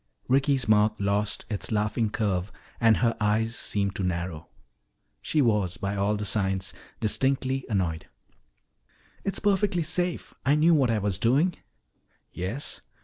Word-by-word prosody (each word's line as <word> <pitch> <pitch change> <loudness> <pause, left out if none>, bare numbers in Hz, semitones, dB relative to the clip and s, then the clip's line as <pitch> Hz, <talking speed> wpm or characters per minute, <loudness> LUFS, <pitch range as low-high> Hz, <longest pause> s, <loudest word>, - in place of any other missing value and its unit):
Ricky's 135 -1 +2
mouth 105 0 +3
lost 100 +1 0
its 105 0 -3
laughing 105 +1 0
curve 100 -3 -1 0.3
and 115 -2 +5
her 115 -1 +1
eyes 110 +2 +1
seemed 100 -1 -2
to 95 - -2
narrow. 85 -3 -3 0.7
She 150 -2 +1
was, 105 -7 +1
by 100 +2 -3
all 100 +1 +1
the 105 0 -3
signs, 95 -2 0 0.3
distinctly 135 +3 0
annoyed. 90 -6 -1 1.2
"It's 195 - -1
perfectly 195 -3 +1
safe. 175 +2 -1
I 140 +3 +3
knew 160 +3 +5
what 135 -6 +3
I 115 - +2
was 100 -3 -1
doing." 140 - +3 0.8
"Yes? 100 +11 -4
105 Hz, 140 wpm, -27 LUFS, 100-135 Hz, 1.2 s, and